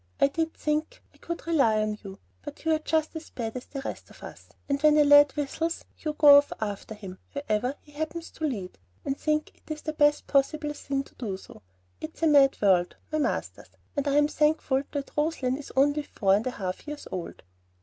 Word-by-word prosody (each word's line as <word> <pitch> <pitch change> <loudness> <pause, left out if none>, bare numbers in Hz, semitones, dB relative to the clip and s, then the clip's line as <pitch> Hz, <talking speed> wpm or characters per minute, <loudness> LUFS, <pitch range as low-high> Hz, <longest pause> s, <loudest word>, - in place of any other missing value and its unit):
I - - +5
did 325 +2 -2
think 305 +1 -2
I - - -23
could 340 - -6
rely 275 -10 +3
on 215 0 0
you; 195 -1 -9 0.2
but 290 +1 -10
you 320 - +3
are 310 - +1
just 315 +1 -1
as 320 0 -7
bad 225 -2 -5
as 250 - -6
the 275 - -6
rest - - -7
of - - -16
us, - - -11 0.2
and 280 0 -1
when 305 0 +5
a 300 - +7
lad 290 0 +7
whistles, 320 +3 -2 0.2
go 305 -2 -3 0.2
off 285 - -4
after 215 0 -4
him 190 -3 -10
wherever 255 -2 -1
he 295 - -20
happens 315 +3 -5
to 315 - -4
lead, 200 - -4 0.3
and 275 - -1
think 305 +1 -2
it 310 - -4
the 310 - -3
best 295 -1 +3
thing - - -19
possible 295 +2 +2
to 275 -1 -4
do 205 -6 -3
so. 190 - -14 0.4
It's 320 +1 -8
a - - +5
mad 280 -3 +5
world, 180 -3 +3 0.2
my 310 - 0
masters; - - -2 0.3
and 285 -1 -1
I'm 290 +1 +4
thankful 300 -3 +1
that 280 -2 -5
Roslein 295 -4 0
is 285 0 -8
only 285 +2 +3
four 195 -9 +1
and 210 +5 +1
a - - +2
half 190 0 -5
years 295 0 -7
old." 180 -2 -6
285 Hz, 210 wpm, -27 LUFS, 245-305 Hz, 0.4 s, a